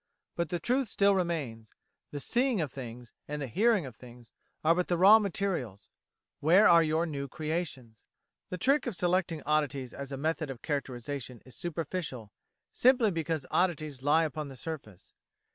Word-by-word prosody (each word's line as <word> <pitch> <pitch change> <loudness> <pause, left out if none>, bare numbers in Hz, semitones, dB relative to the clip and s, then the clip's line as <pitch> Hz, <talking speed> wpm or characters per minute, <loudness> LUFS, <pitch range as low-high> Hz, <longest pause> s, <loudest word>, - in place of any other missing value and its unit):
But 170 -2 -1
the 175 - -1
truth 250 +6 0
still 200 0 +3
remains 150 - -3 0.3
the 145 - -5
seeing 245 - +1
of 150 -6 -2
things, 120 -2 -9
and 150 0 -4
the 140 - -3
hearing 205 - +2
of 125 -4 -9
things, 120 -1 -15 0.3
are 160 +1 +5
but 180 +1 -1
the 175 - +1
raw 200 +5 +8
material: 185 - -2 0.6
where 175 +8 +6
are 170 -1 +7
your 160 +1 +1
new 140 -4 -4
creations? 150 -7 -5 0.5
The 180 - -4
trick 275 - +2
of 235 - -3
selecting 175 -3 0
oddities 145 -4 0
as 140 0 -7
a 135 - -4
method 155 +1 -1
of 130 -3 -8
characterisation 130 -3 -4
is 130 - -12
superficial, 160 - -4 0.4
simply 245 -4 +4
because 160 -4 -2
oddities 155 -7 0
lie 150 +4 +4
upon 155 -1 -3
the 135 - -10
surface. 125 - -8
155 Hz, 165 wpm, -30 LUFS, 135-180 Hz, 0.6 s, raw